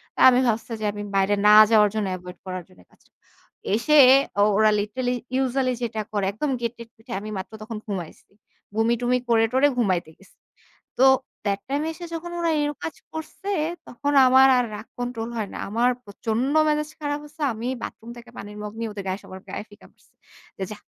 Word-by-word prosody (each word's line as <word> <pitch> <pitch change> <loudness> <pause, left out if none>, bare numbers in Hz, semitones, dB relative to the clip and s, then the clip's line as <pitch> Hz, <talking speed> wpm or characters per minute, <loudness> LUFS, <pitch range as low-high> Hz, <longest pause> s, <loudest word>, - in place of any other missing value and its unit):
তো - - -9
আমি 250 0 +4
ভাবছে 225 +1 -1
যে 215 - -3
আমি 205 0 -7
বাইরে 195 +1 +3
না 210 - +8 0.2
যাওয়ার 210 -2 +6
জন্য 215 -2 -1
এভয়েড 180 0 -10
করার 185 -1 -5
জন্য 185 - -20
কাজটা - - -28 0.6
এসে 300 +7 +3 0.4
ও - - +6
ওরা 215 0 +5
লিটারেলি 245 +5 -2 0.2
ইউজুয়ালি 260 0 +1
যেটা 220 -2 -2
করে 205 -2 0
একদম 275 +8 -2
গেট-টেট 235 0 -5
পিটায়ে, 225 -1 -6
আমি 215 - -7
মাত্র 190 - -6
তখন 225 0 -6
ঘুমাইছি। 185 -6 -7 0.4
বমি-টমি 235 +3 +2
করে-টরে 235 +5 +4
ঘুমাইতে 185 -8 +1
গেছি। 195 - -22 0.6
তো - - +3 0.4
that 200 -1 0
টাইম 285 +2 -1
এসে 345 +2 -9
যখন 340 +1 -5
ওরা 335 -1 +1
এরম 295 0 -2
কাজ 320 - -4 0.2
করছে 320 +5 -6 0.4
তখন 285 +4 -2
আমার 260 +1 +7
আর 250 - +2
রাগ 210 +2 -8
কন্ট্রোল 245 -2 -4
হয় 215 -3 -2
না, - - -5
আমার 235 +4 +2
প্রচন্ড 225 +6 -2 0.2
মেজাজ 300 0 0
খারাপ 290 -1 -2
হইছে। 300 +1 -11
আমি 225 +2 -6 0.2
বাথরুম 230 - -8
থেকে 240 0 -12
পানির 205 +1 -8
মগ 210 0 -6
নিয়ে 230 0 -2
ওদের 200 -2 -7
গায়ে, 190 +2 -2
সবার 190 0 -10
গায়ে 200 - -5
ফিকা 205 - -16
মারছে। - - -30 0.5
যে, 190 - -2
"যাহ, 210 - -8
230 Hz, 190 wpm, -24 LUFS, 205-260 Hz, 0.6 s, না